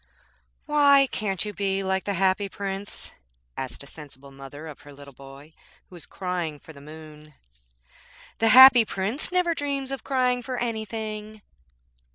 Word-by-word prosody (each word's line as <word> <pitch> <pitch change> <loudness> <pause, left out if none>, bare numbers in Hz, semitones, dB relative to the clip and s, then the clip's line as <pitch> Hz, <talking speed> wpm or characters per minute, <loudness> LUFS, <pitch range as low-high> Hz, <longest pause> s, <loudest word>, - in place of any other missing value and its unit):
'Why 285 -2 +5
can't 195 -3 -2
you 210 - -5
be 195 0 -1
like 190 0 -1
the 200 - -2
Happy 190 +2 +1
Prince?' 195 +1 -6 0.4
asked 130 +1 -6
a - - -12
sensible 140 -2 -12
mother 135 +3 -11
of 155 -3 -10
her 145 - -14
little 140 0 -14
boy 135 +4 -14 0.4
who - - -18
was 170 - -11
crying 180 -5 -4
for 160 - -14
the 140 - -14
moon. 155 0 -13 1.0
'The 225 - +3
Happy 255 0 +9
Prince 210 - -3
never 360 -2 +1
dreams 280 -3 -3
of 270 - -5
crying 250 -2 0
for 255 0 -5
anything.' 215 -2 -5
195 Hz, 155 wpm, -25 LUFS, 155-240 Hz, 1.0 s, Happy